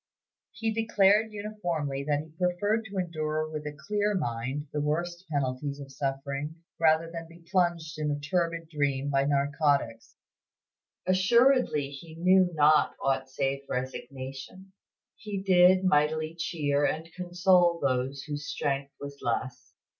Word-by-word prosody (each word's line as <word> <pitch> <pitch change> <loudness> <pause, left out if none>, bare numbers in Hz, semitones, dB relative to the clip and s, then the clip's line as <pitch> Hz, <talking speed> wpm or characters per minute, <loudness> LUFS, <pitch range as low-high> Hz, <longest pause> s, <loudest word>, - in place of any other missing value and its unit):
He 220 +1 -2
declared 215 -1 +3
uniformly 175 -10 -3
that 145 0 +1
he 155 0 -13
preferred 205 +5 0
to 200 -2 -7
endure 155 -3 -1
with 155 -1 -6
a 145 0 -7
clear 210 0 +1
mind 130 -2 -2
the 150 - -1
worst 175 +4 -2
penalties 140 0 -2
of 135 -1 -9
suffering 140 +2 -3 0.2
rather 165 0 +3
than 165 -1 -6
be 165 0 -16
plunged 170 -4 0
in 150 -1 -1
a 145 0 -1
turbid 165 +1 -1
dream 145 -3 -1
by 135 0 +2
narcotics. 140 -4 0 0.9
His 185 0 +3
patience 190 +5 0
was - - +7
unfailing; 270 0 +6
assuredly 145 -2 -2
he 160 +3 -10
knew 185 +2 +4
not 150 0 +4
aught 135 -1 0
save 135 +1 -1
resignation; 135 +8 -6 0.4
he 210 -2 -5
did 185 0 +5
mightily 155 -1 +2
cheer 145 -4 -1
and 160 +2 0
console 180 -1 +3
those 135 0 -1
whose 145 0 -5
strength 140 -1 -2
was 140 0 -8
less. 125 +1 -3
155 Hz, 145 wpm, -28 LUFS, 140-180 Hz, 0.9 s, was